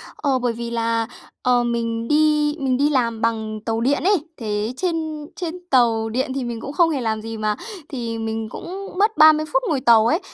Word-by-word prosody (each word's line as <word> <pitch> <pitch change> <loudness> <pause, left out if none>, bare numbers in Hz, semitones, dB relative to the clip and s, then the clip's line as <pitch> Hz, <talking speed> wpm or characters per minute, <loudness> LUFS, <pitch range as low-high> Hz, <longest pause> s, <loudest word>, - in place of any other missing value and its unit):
Ờ, 275 -3 0
bởi 245 -2 0
vì 235 +1 -5
là, 230 -1 0 0.4
ờ, 245 -1 +3
mình 230 -1 -2
đi 300 0 +3
mình 260 -2 +1
đi 285 +2 +3
làm 235 -5 0
bằng 220 -1 -1
tàu 225 0 -1
điện 280 +5 +1
ấy, 400 +2 +4 0.2
thế 215 0 -2
trên 315 -3 -2
trên 345 -2 -4
tàu 230 -4 +3
điện 260 +4 -1
thì 270 - -2
mình 235 -2 -5
cũng 275 - -6
không 335 +1 +4
hề 290 -5 -1
làm 220 -2 -1
gì 225 0 -6
mà, 215 -1 0 0.3
thì 235 -4 -4
mình 225 0 -3
cũng 390 - -7
mất 425 +3 +2
30 310 0 +7
phút - - +2
ngồi 280 -5 0
tàu 230 -3 +5
ấy, 320 +7 +2
245 Hz, 210 wpm, -21 LUFS, 225-300 Hz, 0.4 s, 30